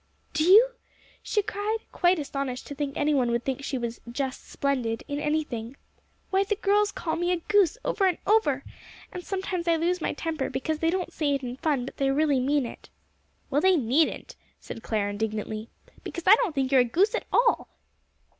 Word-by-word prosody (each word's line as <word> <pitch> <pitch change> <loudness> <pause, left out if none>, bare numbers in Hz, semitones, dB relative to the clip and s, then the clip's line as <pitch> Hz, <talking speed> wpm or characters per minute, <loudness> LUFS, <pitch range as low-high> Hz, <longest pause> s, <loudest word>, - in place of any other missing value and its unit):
"Do 310 0 +1
you?" 420 +9 +7 0.5
she 420 - 0
cried, 415 +3 -2
quite 355 +1 +3
astonished 275 -4 -4
to - - -7
think 285 -1 -4
any 300 +1 +2
one 255 -4 +2
would 235 0 -1
think 270 +1 -2
she 275 - -2
was 235 -1 -4
"just 265 +1 -4
splendid" 250 -5 -1
in 285 0 -3
anything. 285 -5 -2 0.5
"Why, 385 +1 +3
the 420 +1 -1
girls 410 0 +2
call 320 - -3
me 350 +2 0
a 360 - +2
goose 405 +1 +2
over 390 -2 +2
and 360 - +1
over. 300 -11 +2 0.5
And 360 - -6
sometimes 375 -3 -3
I 335 - +4
lose 345 +2 0
my - - -1
temper, 315 -2 -3
because 310 +3 -2
they 325 - +2
don't 360 0 -2
say 290 -3 +1
it 275 - -4
in 245 0 -4
fun, 280 -4 0
but - - -9
they 275 -1 +1
really 285 -1 +2
mean 280 +1 +1
it." - - -10 0.6
"Well, 285 +2 +2
they 375 +1 +5
needn't," 285 +2 +1 0.2
said 225 - -8
Clare 210 -3 -1
indignantly, 215 +1 -3 0.3
"because 345 - -6
I 380 - +9
don't 420 -11 -1
think 265 -1 0
you 270 - +6
are - - +7
a - - +2
goose 370 - +2
at 485 - -3
all." 475 0 +3
300 Hz, 200 wpm, -26 LUFS, 260-360 Hz, 0.6 s, I